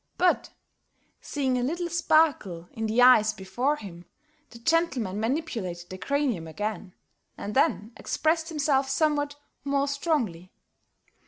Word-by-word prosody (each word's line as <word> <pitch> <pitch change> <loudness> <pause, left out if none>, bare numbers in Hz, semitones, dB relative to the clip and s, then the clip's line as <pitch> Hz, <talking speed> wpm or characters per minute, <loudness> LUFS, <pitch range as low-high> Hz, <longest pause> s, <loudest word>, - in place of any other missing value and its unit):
But, 360 0 +2 0.7
seeing 265 -3 -1
a - - -1
little 345 +7 -1
sparkle 310 - +2
in 225 0 -3
the 230 +3 +3
eyes 215 -4 +6
before 215 +9 -1
him, 180 - -10 0.4
the 235 - -12
gentleman 245 - 0
manipulated 220 - -3
the 185 - -7
cranium 245 - -1
again, 200 +1 -4 0.4
and 205 - -5
then 250 -6 +2
expressed 320 +1 0
himself 280 -4 +1
somewhat 290 0 +1 0.3
more 280 0 +1
strongly. 265 - -1
255 Hz, 120 wpm, -27 LUFS, 205-300 Hz, 0.7 s, eyes